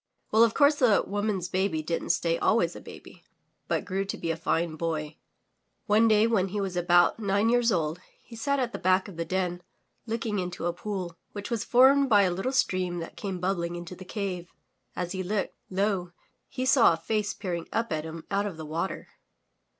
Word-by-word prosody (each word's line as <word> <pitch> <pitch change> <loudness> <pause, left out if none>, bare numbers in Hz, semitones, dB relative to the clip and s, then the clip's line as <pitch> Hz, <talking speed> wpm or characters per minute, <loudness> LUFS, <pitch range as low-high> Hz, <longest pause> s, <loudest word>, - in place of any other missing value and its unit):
Well, 220 +2 +6
of 230 -1 +2
course 290 +1 +5
the 240 -7 +4
woman's 205 -3 -1
baby 185 -4 -1
didn't 165 +2 -3
stay 165 -1 +1
always 175 -7 +2
a - - -9
baby, - - -13 0.4
but - - -1
grew 195 0 -1
to 195 - -4
be 165 - -2
a - - -1
fine 165 0 -1
boy. 155 -2 -3 0.7
One 215 +2 +4
day 215 0 +5
when 215 -5 +2
he 205 +2 -3
was 195 -2 -3
about 175 +2 +4
nine 205 +1 +1
years 240 -1 +3
old, 160 -1 0 0.2
he 235 - -12
sat 280 +5 0
at 250 -3 -1
the - - -4
back 185 +2 +2
of 195 - -10
the 165 0 -3
den, 180 -1 -2 0.5
looking 225 -2 -2
into 180 -2 -4
a 175 - 0
pool, 180 -2 -5
which 205 +3 -6
was 230 -3 -1
formed 270 +2 +5
by 205 -3 +6
a 185 - +2
little 195 +9 -2
stream 185 -9 0
that 165 -1 -6
came 195 -3 -4
bubbling 175 -2 -1
into 175 +1 -7
the 185 - -10
cave. 185 -3 -4 0.5
As 175 -1 -3
he 190 -1 -3
looked, 195 +2 -2 0.2
lo! 190 -2 -1 0.4
he 255 - -3
saw 260 -8 +6
a - - -3
face 210 +3 -2
peering 175 -3 -4
up 230 -5 -1
at 155 -1 -2
him 160 0 -7
out 200 +1 +1
of 185 -6 -7
the 160 - -7
water. 165 +5 -3
190 Hz, 205 wpm, -27 LUFS, 175-215 Hz, 0.7 s, Well